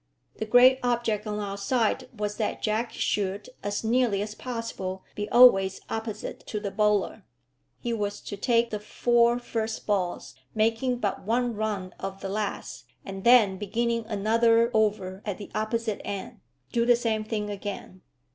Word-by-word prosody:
The 220 - -4
great 250 +3 +6
object 235 -3 0
on 210 0 -2
our 200 -1 -4
side 245 +4 0
was 210 -2 -4
that 215 - -2
Jack 220 +2 0
should, 200 +3 -2
as 205 +2 -3
nearly 225 -3 +2
as 210 0 -6
possible, 230 -6 -5
be 210 0 -4
always 195 -6 +6
opposite 220 -1 -4
to 210 - -3
the 205 -1 -4
bowler. 210 0 +1 0.5
He 240 -2 -3
was 205 -2 -2
to 205 - -6
take 235 +3 +2
the 210 - -2
four 235 +2 +2
first 225 -2 -3
balls, 190 -4 -1 0.2
making 225 +3 +1
but 205 -5 -2
one 240 +3 0
run 205 -4 -3
off 195 0 -5
the 195 - -5
last, 210 +1 -4 0.2
and 195 -1 -7
then 225 -6 +6
beginning 230 +3 -1
another 230 +2 +3
over 205 -3 0
at 205 -3 -3
the 205 - -9
opposite 220 0 -2
end 200 -1 -6 0.3
do 235 - +2
the 240 0 +5
same 225 -2 -1
thing 210 -1 -3
again. 200 -2 -6
215 Hz, 160 wpm, -27 LUFS, 205-235 Hz, 0.5 s, great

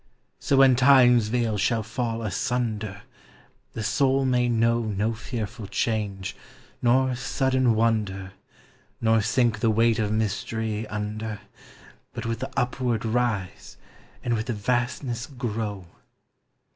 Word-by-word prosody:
So 140 - +1
when 135 -2 +7
Time's 125 -3 +6
veil 115 -2 0
shall 110 +3 +1
fall 115 0 -3
asunder, 110 -1 -2 0.7
The 110 - -4
soul 135 +4 +2
may 125 -1 +2
know 115 0 +2
No 110 0 -1
fearful 110 -1 -5
change, 100 -3 -2 0.5
nor 130 +2 +3
sudden 130 -1 +1
wonder. 105 -4 0 0.7
Nor 115 0 +3
sink 115 +2 +1
the 115 - +2
weight 115 +1 +3
of 105 -1 0
mystery 110 0 -2
under. 105 +1 -4 0.7
But - - -5
with 115 -1 -2
the 130 - -4
upward 125 -2 0
rise, 110 - -2 0.5
and 120 - 0
with 110 +1 -2
the 120 - -1
vastness 120 +3 -2
grow. 110 - -4
115 Hz, 120 wpm, -25 LUFS, 105-125 Hz, 0.7 s, when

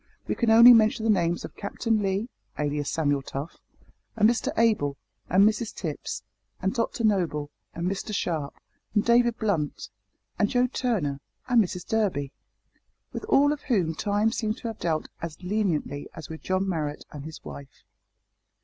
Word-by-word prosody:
We - - 0
can 235 - 0
only 235 +2 +10
mention 220 -1 +4
the 225 - +4
names 175 -3 +1
of - - -10
Captain 220 +2 -1
Lee 195 +3 -1 0.3
(alias 145 -1 -1
Samuel 145 -3 +1
Tough), 140 +4 -6 0.6
and 215 -1 +5
Mr 235 +1 +1
Abel, 210 -12 +2 0.3
and 195 +3 +6
Mrs 220 +1 -1
Tipps, 150 - -5 0.4
and 190 - 0
Dr 230 0 -2
Noble, 165 -9 +1 0.2
and 170 - -3
Mr 195 +3 -3
Sharp, 160 -8 -2 0.4
and 205 - +3
David 235 0 +4
Blunt, 175 - -1 0.5
and 205 - +3
Joe 250 0 +3
Turner, 215 - -1 0.3
and 245 -3 +5
Mrs 180 -1 -6
Durby, 190 -11 0 0.8
with - - -5
all 290 -8 +4
of 295 - -7
whom 185 - +1
time 205 +5 +1
seemed 220 -1 -2
to 235 - -5
have 225 - -8
dealt 160 -2 -1
as 165 -2 -5
leniently 180 -8 -1
as 160 -4 -9
with 160 0 -8
John 185 +1 0
Marrot 150 -5 -3
and 145 -2 -8
his 160 +1 -10
wife. 140 -2 -10
195 Hz, 165 wpm, -26 LUFS, 155-225 Hz, 0.8 s, only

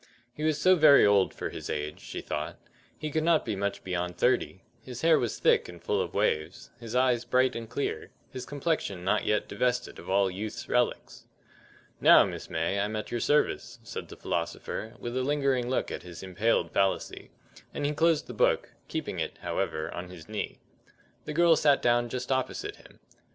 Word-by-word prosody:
He - - -9
was 155 -1 +1
so 185 +3 +6
very 155 -4 +7
old 100 -2 +4
for - - -5
his - - -7
age, 75 0 -3
she - - -7
thought; 75 0 -4 0.4
he 155 - -4
could 155 +1 0
not 165 -1 +3
be 110 - -2
much 100 +1 -3
beyond 90 -1 -3
thirty; 125 -6 +1 0.2
his 125 +1 -8
hair 165 -1 +5
was 120 - -2
thick - - +3
and 85 -1 -10
full - - 0
of - - -5
waves, 75 +4 -1
his 115 0 -7
eyes 125 -2 +3
bright 130 +2 +2
and 115 -1 -6
clear, 140 - -3 0.2
his 130 -2 -6
complexion 145 - -2
not 100 +3 +1
yet 105 - +1
divested 125 0 -1
of - - -10
all 95 0 +3
youth's 105 +3 -6
relics. 125 0 -1 0.7
"Now, - - +8
Miss - - -6
May, 85 +5 -1
I'm 105 +2 -1
at 105 - -4
your 120 - -1
service," 145 +6 +1
said - - -6
the - - -11
philosopher, 90 +6 -4
with 120 0 -5
a 130 - +1
lingering 135 -3 +1
look 130 - -1
at - - -5
his 90 0 -10
impaled 95 +5 0
fallacy; 95 -1 -1 0.4
and 145 - -3
he 145 - +1
closed 160 0 +2
the - - -8
book, - - +1
keeping - - -4
it, - - -3
however, 80 0 -2
on 90 +1 -6
his 90 -3 -11
knee. 105 -1 -4 0.7
The 150 - -4
girl 170 +1 +5
sat 145 -3 +4
down 120 0 +2
just 125 +1 -4
opposite 130 -1 -1
to - - -19
him. - - -18
120 Hz, 195 wpm, -28 LUFS, 95-140 Hz, 0.7 s, Now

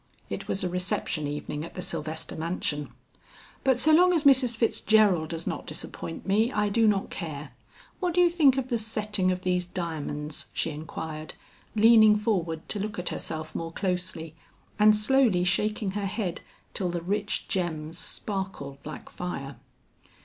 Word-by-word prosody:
It - - -4
was 195 - -1
a - - +1
reception 180 -4 -1
evening 150 +1 -4
at 170 - -9
the 180 - -4
Sylvester 160 -2 -4
mansion. 160 -3 -2 0.7
"But 265 -2 +4
so 310 +5 +5
long 360 +3 +6
as 325 -4 +2
Mrs. 260 -5 +5
Fitzgerald 215 -7 +3
does 165 0 -4
not - - -4
disappoint 165 - -6
me, 215 +5 +2
I 210 -3 +1
do 225 +2 +3
not 200 -2 +1
care. 155 -4 -6 0.5
What 355 -2 -1
do 360 - +5
you 350 - +7
think 305 -6 +4
of 260 -1 -2
the 235 -3 +1
setting 210 -3 0
of 185 0 -1
these 180 -1 0
diamonds?" 155 -4 -4
she 165 - -1
inquired, 155 +1 -6 0.4
leaning 220 -1 +7
forward 180 -7 -1
to 210 - -2
look 210 +1 -4
at 180 - -2
herself 155 -1 -4
more 165 0 -3
closely, 180 -3 -2 0.5
and 215 0 +7
slowly 215 -4 +3
shaking 205 +2 0
her 200 0 -2
head 195 -3 -3 0.3
till 185 -3 0
the 175 -1 -3
rich 205 +3 -1
gems 165 -4 -2
sparkled 190 -9 -4
like 155 - -8
fire. 140 -6 -6
185 Hz, 165 wpm, -27 LUFS, 160-215 Hz, 0.7 s, you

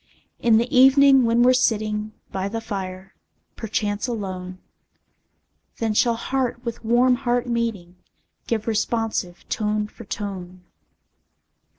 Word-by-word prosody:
In 230 -2 +4
the 240 +5 0
evening, 270 0 +6
when 230 +1 +3
we're 255 +1 +6
sitting 215 -3 0 0.2
By 190 0 -2
the 225 +3 -3
fire, 190 -3 -6 0.4
perchance 210 0 -2
alone, 185 -5 -5 1.2
Then 225 -2 -1
shall 235 +2 +3
heart 245 0 -2
with 235 0 -5
warm 245 +2 +3
heart 245 -2 0
meeting, 225 -7 -3 0.5
Give 220 -2 -1
responsive 220 -5 -2
tone 210 -1 -1
for 230 - -13
tone. 185 -4 -6
225 Hz, 115 wpm, -23 LUFS, 200-240 Hz, 1.2 s, evening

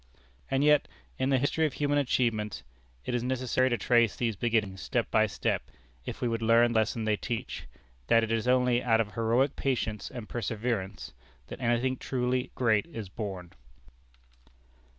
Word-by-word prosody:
And 135 +1 +1
yet 150 -1 +4 0.3
in 130 +1 +1
the 135 - +4
history 150 +4 +1
of 150 - -7
human 145 0 +1
achievements, 115 -6 0 0.4
it - - -3
is 120 - +1
necessary 130 +1 +1
to 120 - +1
trace 115 +1 +3
these 115 -3 -1
beginnings 105 -3 0
step 120 -4 -1
by 110 0 +4
step, 100 - -2 0.4
if - - -6
we 125 - +1
would 115 -1 -1
learn 115 +1 +4
the 110 - +4
lesson 110 +1 -1
they 105 -1 +1
teach, 120 +1 -5 0.4
that 115 - +5
it 115 - -2
is 115 +1 0
only 125 -1 +3
out 115 -2 +3
of 105 -3 -1
heroic 115 +6 +1
patience 115 -6 -2
and 120 -4 -8
perseverance 110 -3 -3 0.4
that - - -8
anything 120 +2 +1
truly 125 0 -1
great 110 -2 +2
is 115 - -7
born. 95 -4 -6
120 Hz, 170 wpm, -29 LUFS, 110-130 Hz, 0.4 s, that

